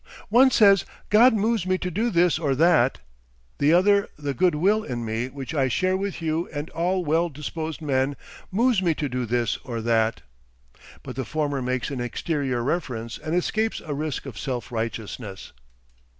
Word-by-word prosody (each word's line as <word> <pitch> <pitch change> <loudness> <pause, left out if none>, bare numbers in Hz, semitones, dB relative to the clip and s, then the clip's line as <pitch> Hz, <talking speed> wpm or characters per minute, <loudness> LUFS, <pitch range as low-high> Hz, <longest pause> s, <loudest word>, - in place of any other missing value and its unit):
One 250 +5 +6
says 200 -6 +5 0.3
God 225 +3 +6
moves 215 -2 0
me 185 0 +2
to 180 -1 -4
do 220 +7 0
this 175 -4 +3
or 140 -5 0
that; 155 -4 +3 0.6
the 145 +2 +4
other 200 +4 +4
the 145 -2 -3
Good 175 +4 +2
Will 205 +8 +2
in 120 - -4
me 110 +2 -2
which 135 +2 -7
I 135 -4 +2
share 185 +9 +1
with 195 -3 -3
you 160 +2 -1
and 145 +1 -5
all 180 +2 0
well 165 +3 +2
disposed 155 +2 -5
men, 135 -1 0 0.4
moves 230 +1 +2
me 170 -4 +1
to 145 - -2
do 125 -2 -3
this 120 -1 0
or 120 -4 -6
that. 115 0 +1 0.8
But 130 -3 -7
the 130 - -2
former 145 -3 -2
makes 125 +2 -2
an 130 -3 -3
exterior 130 -1 -2
reference 120 -6 -3
and 155 +2 -3
escapes 220 +5 0
a 155 - -5
risk 150 0 -3
of 125 -8 -8
self 125 -3 -4
righteousness. 110 -3 -5
150 Hz, 180 wpm, -24 LUFS, 125-180 Hz, 0.8 s, One